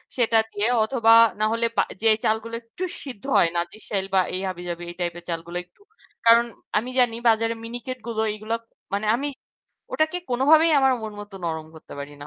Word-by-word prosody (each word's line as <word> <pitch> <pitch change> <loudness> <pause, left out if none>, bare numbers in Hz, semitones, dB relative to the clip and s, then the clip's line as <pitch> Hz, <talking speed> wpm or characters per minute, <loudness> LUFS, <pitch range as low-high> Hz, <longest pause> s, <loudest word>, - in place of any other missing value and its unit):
সেটা 230 -2 +3
দিয়ে 205 +2 0 0.2
অথবা 225 0 +2 0.3
না 215 - +2
হলে 230 +1 +1
বা - - +5 0.2
যে 225 - +4 0.2
চালগুলো 225 +1 0
একটু 230 +11 -8 0.2
সিদ্ধ 255 -6 -9
হয় 170 - +5
না, - - +2
নাজিরশাইল 195 +1 -4
বা - - +6
এই 185 - -2
হাবিজাবি 175 -1 -5
এই 175 - -8
type 175 -1 -2
এর - - -18
চালগুলো 170 +1 -4
একটু। 180 - -33 0.4
কারণ 235 +1 +7 0.3
আমি 230 +4 -1
জানি 240 -2 +3
বাজারে 225 0 +3
মিনিকেট 245 +2 -6
গুলো 225 -2 -1
এইগুলা 215 +2 -3 0.4
মানে 205 +2 -1
আমি 280 +4 -2 0.7
ওটাকে 315 +3 +1
কোনোভাবেই 305 +6 +5
আমার 265 -1 +4
মন 215 - -5
মতো 205 -1 -11
নরম 160 -2 -3
করতে 160 - -13
পারি 140 +1 -7
না। - - -8
220 Hz, 190 wpm, -24 LUFS, 185-240 Hz, 0.7 s, কারণ